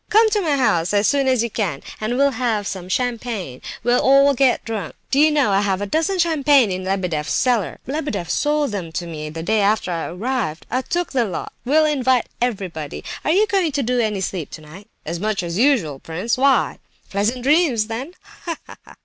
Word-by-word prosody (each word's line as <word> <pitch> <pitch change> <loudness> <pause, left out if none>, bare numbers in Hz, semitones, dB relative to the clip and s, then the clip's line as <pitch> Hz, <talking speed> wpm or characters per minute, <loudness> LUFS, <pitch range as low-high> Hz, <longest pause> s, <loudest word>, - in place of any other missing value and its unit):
Come 440 +1 +5
to 420 - +2
my 305 -6 +1
house 175 -7 +1
as 205 +1 +3
soon 280 -2 +2
as 255 -3 +3
you 235 - -3
can, 185 -12 -2 0.2
and 230 +3 -1
we'll 280 +1 +4
have 225 -4 -1
some 185 -2 -5
champagne. 230 - -2 0.2
We'll 245 +1 +3
all 275 +1 +5
get 265 -1 +2
drunk! 215 -7 -4 0.2
Do 275 - +3
you 310 +1 +6
know 290 -8 +2
I 195 +1 +3
have 195 -2 0
a 205 - -2
dozen 320 - 0
of 360 - +4
champagne 285 - +3
in 185 0 -3
Lebedeff's 180 -6 -1
cellar? 240 -6 +1
Lebedeff 270 - -3
sold 295 - +1
them 185 -5 -4
to 175 0 -3
me 155 -2 -6
the 160 +1 -6
day 220 +5 +1
after 200 -2 +1
I 165 -1 -2
arrived. 205 -3 -3
I 255 +2 +1
took 350 +6 -2
the 255 -3 +2
lot. 190 - -5
We'll 310 +5 +4
invite 260 -5 +2 0.2
everybody! 185 - -3 0.2
Are - - -1
you 390 +7 +4
going 385 -6 +1
to 280 -1 0
do 250 +1 0
any 215 -4 0
sleeping 180 -4 -3
tonight?" 170 +7 -13 0.2
"As 170 +2 -4
much 210 -1 -1
as 170 +2 -3
usual, 225 - +2
prince—why?" 235 - +1 0.3
"Pleasant 220 +5 -1
dreams 280 -6 +3
then—ha, 290 +7 -7
ha!" - - -15
235 Hz, 200 wpm, -21 LUFS, 190-280 Hz, 0.3 s, you